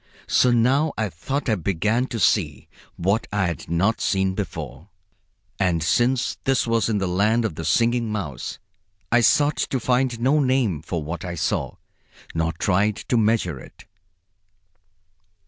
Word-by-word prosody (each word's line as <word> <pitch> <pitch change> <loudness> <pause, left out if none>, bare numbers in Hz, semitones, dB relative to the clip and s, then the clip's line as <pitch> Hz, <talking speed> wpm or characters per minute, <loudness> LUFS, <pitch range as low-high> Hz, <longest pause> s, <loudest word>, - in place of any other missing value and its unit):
So 125 - +3
now 130 +6 +2
I 110 -2 -1
thought 135 - -4
I 115 - +2
began 105 +7 0
to 120 - -5
see 80 -11 +1 0.3
what 100 +6 0
I 105 -2 +1
had 85 -4 -4
not 95 +7 +1
seen 95 -1 +1
before. 80 - -6 0.7
And 90 -5 +1
since 120 +9 +1
this 135 -1 +1
was 115 -1 +1
in 110 - +1
the 95 -2 -1
land 105 +6 +2
of 110 - -2
the 85 - -6
Singing 115 +7 +1
Mouse, 80 - -5 0.5
I 120 +1 +5
sought 145 +4 +3
to 130 +1 -1
find 125 -1 0
no 135 +6 +3
name 130 - +1
for 80 0 -4
what 80 +3 -5
I 90 -1 -5
saw, 80 - -2 0.6
nor 80 0 0
tried 100 +5 +1
to - - +2
measure 105 - +1
it. - - -15
105 Hz, 155 wpm, -23 LUFS, 85-120 Hz, 0.7 s, I